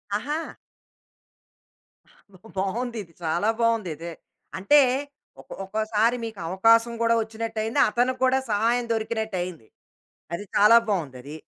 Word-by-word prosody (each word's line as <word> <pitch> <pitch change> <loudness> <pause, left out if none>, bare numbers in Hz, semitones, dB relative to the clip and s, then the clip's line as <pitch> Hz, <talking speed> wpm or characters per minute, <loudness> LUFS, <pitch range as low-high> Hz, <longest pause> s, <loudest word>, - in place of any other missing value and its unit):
ఆహా! 290 +9 -2 2.2
బావుందిది. 215 0 -3
చాలా 170 +6 0
బావుందిదే. 185 -8 -1 0.5
అంటే 200 +11 +5 0.6
ఒకొ 135 - -11
ఒక్కొసారి 220 +3 +1
మీకవకాశం 225 +3 +2
గూడా 230 0 +3
వచ్చినట్టయింది, 220 0 -3
అతనికి 250 +3 0
గూడా 260 +1 +3
సహాయం 235 +4 +1
దొరికినట్టయింది. 205 - -3 0.7
అది 205 - -5
చాలా 210 +3 +7
బావుందది. 145 -6 -3
220 Hz, 90 wpm, -25 LUFS, 185-230 Hz, 2.2 s, చాలా